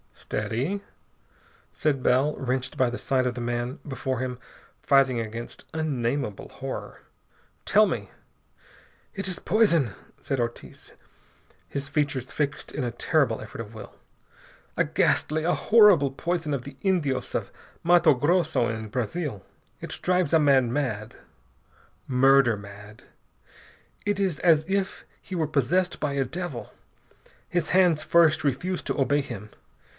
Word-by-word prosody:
"Steady!" 145 - -3 0.9
said 145 -4 0
Bell, 130 +5 +2
wrenched 130 0 -2
by 130 -2 +3
the 120 - -4
sight 130 -2 +1
of 125 - -2
the 120 - -4
man 120 +3 -3
before 130 -2 -3
him 125 -1 -4 0.4
fighting 135 -3 +3
against 115 +1 -6
unnameable 135 -7 -2
horror. - - -7 0.6
"Tell - - +5
me - - -3 0.5
" - - -26 0.3
"It 195 -1 -3
is 185 -1 -2
poison," 170 - +2 0.3
said 135 -2 -2
Ortiz, 120 0 -5 0.7
his 140 0 -4
features 145 -3 -1
fixed 140 -2 -3
in 145 - -3
a 120 - -2
terrible 135 -4 +1
effort - - -7
of 110 -1 -9
will. 110 - -10 0.8
"A - - +3
ghastly, 155 +1 +1
a 175 +2 +2
horrible 205 - +5
poison 165 +1 -2
of 135 -3 -2
the 140 0 -10
Indios 170 -9 0
of - - -2 0.3
Matto 170 -2 +6
Grosso, 150 -2 +1
in 110 -1 -4
Brazil. 125 - -3 0.4
It - - -6
drives 180 -3 +1
a 160 - +6
man 135 -5 +4
mad, 115 -6 -2 0.9
murder 135 -2 +5
mad. 105 +1 -12 1.0
It 205 -1 0
is 190 -6 0
as 160 -3 +4
if 195 0 -1 0.2
he 185 - -7
were 165 -2 +1
possessed 170 +6 +1
by 145 -2 -1
a 135 -1 0
devil. 160 -2 -6 0.8
His 175 -3 -1
hands 180 -4 +4
first 160 -1 +4
refuse 175 +7 -1
to - - -3
obey 145 +2 +2
him. 115 -6 -8
140 Hz, 140 wpm, -26 LUFS, 125-165 Hz, 1.0 s, Matto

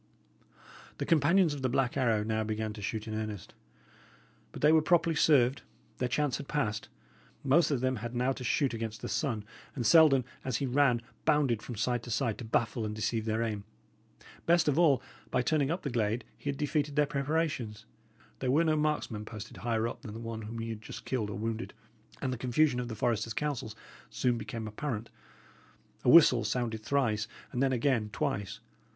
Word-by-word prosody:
The - - -2
companions 165 +2 +4
of 145 - -6
the 130 - +1
Black 125 -1 +1
Arrow 115 -6 +2
now 110 0 -1
began 110 0 -3
to 105 - -9
shoot 110 +2 -3
in 110 - -4
earnest. 110 -3 -5 1.0
But - - -9
they 150 - +7
were 160 0 +6
properly 165 0 +3
served; 135 -4 +4 0.4
their 125 - 0
chance 140 +1 0
had - - -8
past; 110 -8 -2 0.5
most 145 +5 +4
of 140 -5 0
them 130 -1 0
had 120 +2 -6
now 125 +2 +1
to 130 - -5
shoot 130 +2 +1
against 115 -1 -5
the - - -2
sun; 120 -10 -1 0.3
and 125 -4 -2
Selden, 140 -3 +6 0.2
as 130 -3 -1
he 140 - -1
ran, 125 -2 +2 0.2
bounded 145 -8 +2
from 120 - -7
side 120 +3 0
to 120 - -10
side 115 -2 -1
to - - -5
baffle 115 0 0
and 105 0 -3
deceive 110 +1 -1
their 110 +1 0
aim. 105 -3 -3 0.8
Best 170 -1 +4
of 145 +2 +2
all, 150 -6 +4 0.3
by 125 - +1
turning 145 0 +1
up 175 +4 -2
the 140 - -2
glade 115 0 0
he 145 - -5
had 140 - -2
defeated 145 -1 -1
their 150 -1 +4
preparations; 140 -7 -2 0.5
there 130 - -1
were 150 +6 +4
no 155 -1 +2
marksmen 150 -8 -1
posted 110 -1 -9
higher 115 -1 0
up - - -7
than 110 -7 -8
the - - -6
one 115 -1 -5
whom 110 +2 -7
he 115 0 -4
had 110 -1 -5
just - - -9
killed 115 -6 -1
or 100 - -5
wounded; 115 +2 -4 0.5
and 130 -1 0
the 125 - -6
confusion 125 +1 +2
of 125 - -3
the 115 - -5
foresters' 115 0 -1
counsels 135 -8 -3 0.3
soon 125 -1 +1
became 110 0 -5
apparent. 115 0 -4 0.9
A - - +3
whistle 130 -6 +7
sounded 115 -3 -2
thrice, 110 -5 0 0.2
and 125 - -2
then 135 -1 +3
again 120 -3 +1
twice. 100 0 -3
120 Hz, 195 wpm, -30 LUFS, 110-145 Hz, 1.0 s, they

